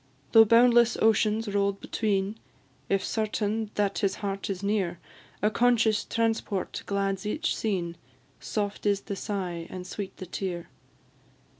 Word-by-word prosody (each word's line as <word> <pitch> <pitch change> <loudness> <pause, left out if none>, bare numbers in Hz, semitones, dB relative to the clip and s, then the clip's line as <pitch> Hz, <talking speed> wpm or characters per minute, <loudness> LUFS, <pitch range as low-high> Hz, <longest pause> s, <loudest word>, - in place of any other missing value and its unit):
Though 225 0 +9
boundless 235 +1 +5
oceans 220 0 +3
roll'd 200 -1 0
between, 205 0 -1 0.5
If 195 -1 +1
certain 215 0 -1
that 205 -1 0
his 195 -3 +1
heart 195 -1 -4
is 195 0 -3
near, 200 -4 0 0.5
A 210 - +3
conscious 230 -2 +3
transport 225 -4 -1
glads 195 -1 -1
each 255 +9 -1
scene, 180 -6 -2 0.4
Soft 205 -1 -3
is 200 -1 +2
the 200 - -5
sigh 180 -5 -4
and 180 -1 -7
sweet 195 +1 -6
the 185 - -7
tear. 180 -1 -4
205 Hz, 135 wpm, -27 LUFS, 195-220 Hz, 0.5 s, Though